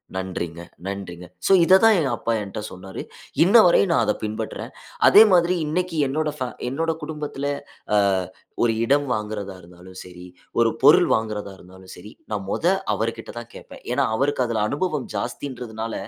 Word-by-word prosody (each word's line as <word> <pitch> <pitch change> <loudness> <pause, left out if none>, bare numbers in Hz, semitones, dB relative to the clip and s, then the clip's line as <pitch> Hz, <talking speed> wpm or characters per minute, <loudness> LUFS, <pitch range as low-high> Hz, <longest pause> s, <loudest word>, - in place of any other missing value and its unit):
நன்றிங்க. 85 -3 -4 0.2
நன்றிங்க. 95 -3 -6 0.2
சோ, - - +2
இத 185 +3 +7
தான் 225 -2 +7
எங்க 140 - 0
அப்பா 115 - -1
என்கிட்ட 100 0 -6
சொன்னாரு. 95 +1 -8 0.4
இன்னவரையும் 190 -1 +5
நான் - - +3
அத - - +1
பின்பற்றேன். 110 0 -5 0.4
அதேமாதிரி 185 -4 +6
இன்னக்கி 170 +2 -2
என்னோட 150 +3 -1
ஃபே 130 - -2 0.2
என்னோட 165 +5 -1
குடும்பத்துல 150 -2 -5 0.5
அ - - +5 0.7
ஒரு 115 -1 +2
இடம் 140 +3 +2
வாங்குறதா 105 -3 -5
இருந்தாலும் 90 +2 -14
சரி, 90 0 -12 0.4
ஒரு 115 -1 +3
பொருள் 150 +5 +7
வாங்குறதா 105 -3 -4
இருந்தாலும் 95 +1 -14
சரி, 105 +4 -12 0.2
நான் 100 -2 -3
மொத - - -2 0.3
அவர்கிட்ட 115 0 -4
தான் 120 0 -11
கேட்பேன். - - -12
ஏன்னா, - - +2
அவருக்கு 135 0 +1
அதுல 110 -3 0
அனுபவம் 150 -2 -2
ஜாஸ்தின்றதுனால 120 -2 -5
115 Hz, 150 wpm, -23 LUFS, 100-150 Hz, 0.7 s, இத